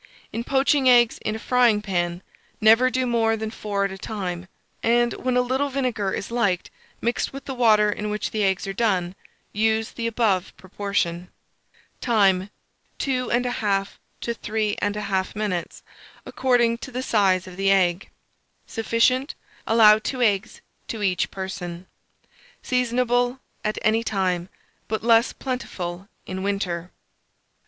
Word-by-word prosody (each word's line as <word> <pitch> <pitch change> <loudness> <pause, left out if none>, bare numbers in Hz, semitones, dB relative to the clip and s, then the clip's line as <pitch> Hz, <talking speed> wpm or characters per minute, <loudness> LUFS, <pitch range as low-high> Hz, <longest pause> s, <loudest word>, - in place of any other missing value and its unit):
In 230 - -2
poaching 270 0 +3
eggs 240 -2 +5
in 215 - -3
a - - -3
frying 240 -2 +3
pan, 175 -3 -2 0.4
never 225 +4 +6
do 255 0 0
more 225 -2 +2
than 220 0 -4
four 205 -3 -2
at 195 - -3
a 195 - -8
time; 185 -4 -4 0.3
and, 240 +1 +2
when 255 -1 -1
a - - +5
little 265 +3 0
vinegar 250 -7 -1
is 200 - -4
liked 205 -7 0 0.3
mixed 235 +1 -1
with 275 0 -9
the 270 - -4
water 215 -4 +4
in 210 +1 -4
which 210 0 -3
the 215 -1 0
eggs 190 -1 +1
are 195 - -4
done, 190 -5 0 0.4
use 220 +1 +1
the 230 -1 -3
above 215 -5 0
proportion. 185 -2 -2 0.7
Time. 200 -5 +2 0.5
2 255 -2 -1
1/2 215 -5 0 0.3
to 235 - -2
3 215 -2 -2
1/2 200 -2 -1
minutes, 200 -5 -3 0.4
according 240 -2 +2
to 275 - -7
the 255 +1 -3
size 195 -6 +2
of 185 -2 -10
the 195 +1 +1
egg. 185 -1 +2 0.6
Sufficient. 250 +4 +1 0.3
Allow 215 -1 +7
2 255 +4 -4
eggs 210 0 0 0.3
to 220 -2 -4
each 185 -3 +1
person. 185 -2 -6 0.8
Seasonable 245 0 +1 0.2
at 215 0 -1
any 220 +1 +2
time, 185 -4 -1 0.4
but 220 0 -2
less 230 +1 +4
plentiful 190 -8 -5 0.2
in 190 0 -5
winter. 185 -3 -2
215 Hz, 145 wpm, -24 LUFS, 195-240 Hz, 0.8 s, Allow